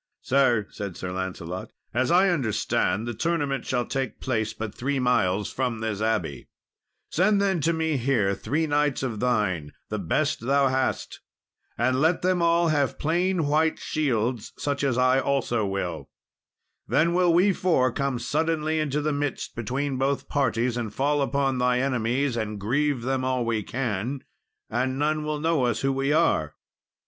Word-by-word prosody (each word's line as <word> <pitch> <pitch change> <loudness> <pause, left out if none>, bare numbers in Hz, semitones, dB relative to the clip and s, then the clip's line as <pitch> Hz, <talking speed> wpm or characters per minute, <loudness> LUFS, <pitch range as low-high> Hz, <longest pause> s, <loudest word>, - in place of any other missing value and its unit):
"Sir," 125 -5 +3
said 100 -4 -6
Sir 90 - -5
Lancelot, 90 -1 -5 0.2
"as 125 +2 +1
I 185 +3 +5
understand, 120 - 0
the 120 - -2
tournament 145 -2 -1
shall 120 -2 0
take 135 -1 -3
place 110 -4 -1
but 110 -2 -6
three 140 +3 -2
miles 105 -6 +1
from 125 -3 -1
this 110 -2 -3
abbey; 105 - -1 0.6
send 200 +4 +3
then 195 -4 +1
to 165 - +2
me 160 -2 0
here, 120 -6 +1
three 155 +10 -1
knights 145 -2 +1
of 115 -5 -3
thine, 105 -11 0 0.2
the 110 - -2
best 140 - 0
thou 140 0 +4
hast, 130 0 -1 0.6
and 130 +2 +1
let 165 +3 +2
them 185 -1 +2
all 170 0 +3
have 145 -3 +1
plain 175 +2 +1
white 155 +2 +2
shields, 125 -6 -1
such 140 -1 -2
as 130 -3 +1
I 130 +1 +4
also 125 -6 0
will; 90 -4 -4 0.8
then 170 +2 +2
will 180 -1 +4
we 185 +4 +4
four 160 -10 +2
come 140 0 -1
suddenly 155 +4 0
into 150 -1 0
the 150 0 0
midst 145 -1 -3
between 130 +4 -2
both 135 +1 0
parties, 125 -3 0
and 115 -3 -3
fall 145 +5 +1
upon 135 -1 0
thy 125 0 +2
enemies, 130 0 0
and 110 -2 -3
grieve 130 +4 0
them 130 +1 -1
all 130 -2 0
we 115 -2 0
can, 120 +3 -3 0.4
and 130 +3 -1
none 150 +1 0
will 150 0 -2
know 160 -4 +1
us 120 -3 0
who 135 0 +1
we 135 +1 0
are." 150 - +2
130 Hz, 165 wpm, -25 LUFS, 115-150 Hz, 0.8 s, I